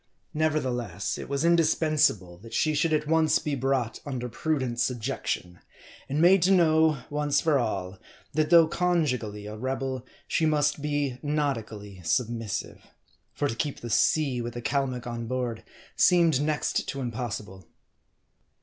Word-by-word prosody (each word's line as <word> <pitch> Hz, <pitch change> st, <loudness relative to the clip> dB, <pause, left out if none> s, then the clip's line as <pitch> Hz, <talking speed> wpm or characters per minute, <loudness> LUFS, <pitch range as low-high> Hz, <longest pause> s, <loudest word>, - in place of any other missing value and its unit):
Nevertheless, 120 Hz, -, -1 dB
it -, -, -7 dB
was 140 Hz, +3 st, 0 dB
indispensable 155 Hz, -, +2 dB
that 115 Hz, +3 st, -9 dB
she 155 Hz, -, +2 dB
should 155 Hz, +2 st, +1 dB
at 150 Hz, -1 st, +1 dB
once 160 Hz, 0 st, +3 dB
be 150 Hz, -, -3 dB
brought 130 Hz, -3 st, -1 dB
under 130 Hz, -4 st, -4 dB
prudent 130 Hz, -2 st, -2 dB
subjection; 110 Hz, -7 st, -2 dB, 0.5 s
and 140 Hz, +3 st, -1 dB
made 180 Hz, +3 st, +6 dB
to 180 Hz, -, +3 dB
know, 160 Hz, -6 st, +4 dB
once 145 Hz, -1 st, +1 dB
for 155 Hz, -4 st, +2 dB
all, 95 Hz, -5 st, -3 dB, 0.3 s
that 155 Hz, -1 st, +1 dB
though 170 Hz, -2 st, +7 dB
conjugally 130 Hz, -13 st, -1 dB
a 105 Hz, +1 st, -6 dB
rebel, 130 Hz, +2 st, -3 dB, 0.2 s
she 160 Hz, -, +1 dB
must 150 Hz, -1 st, +1 dB
be 145 Hz, -3 st, -1 dB
nautically 115 Hz, -10 st, -3 dB
submissive. 115 Hz, +3 st, -2 dB, 0.5 s
For 145 Hz, -, -1 dB
to -, -, -2 dB
keep 140 Hz, +5 st, -3 dB
the 120 Hz, -, -6 dB
sea 135 Hz, -3 st, +2 dB
with 120 Hz, 0 st, -5 dB
a 120 Hz, -, -4 dB
Calmuc 130 Hz, -3 st, -1 dB
on 120 Hz, -1 st, -5 dB
board, 125 Hz, -2 st, -3 dB, 0.3 s
seemed 170 Hz, -6 st, +4 dB
next 150 Hz, 0 st, -1 dB
to 140 Hz, -, -4 dB
impossible. 110 Hz, -7 st, -5 dB
135 Hz, 145 wpm, -27 LUFS, 115-155 Hz, 0.5 s, though